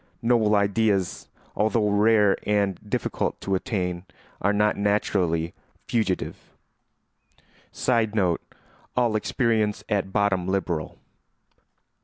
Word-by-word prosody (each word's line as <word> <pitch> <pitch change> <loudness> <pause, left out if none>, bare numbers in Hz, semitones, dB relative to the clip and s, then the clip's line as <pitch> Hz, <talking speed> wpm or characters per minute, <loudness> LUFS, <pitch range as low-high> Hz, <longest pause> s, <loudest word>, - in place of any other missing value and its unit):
Noble 115 -3 +3
ideas, 100 -2 +1 0.3
although 110 0 +2
rare 105 0 +4
and 100 -3 +1
difficult - - -2
to 95 - -2
attain, 90 -2 -2 0.3
are 100 - +3
not 105 +1 +2
naturally 95 -5 0 0.3
fugitive. 105 -6 -1 1.3
[Sidenote: 110 -8 +1 0.6
All 120 -3 +2
experience 110 -2 0
at 100 -2 0
bottom 100 -3 +1
liberal. 90 -5 -2
100 Hz, 90 wpm, -25 LUFS, 95-110 Hz, 1.3 s, rare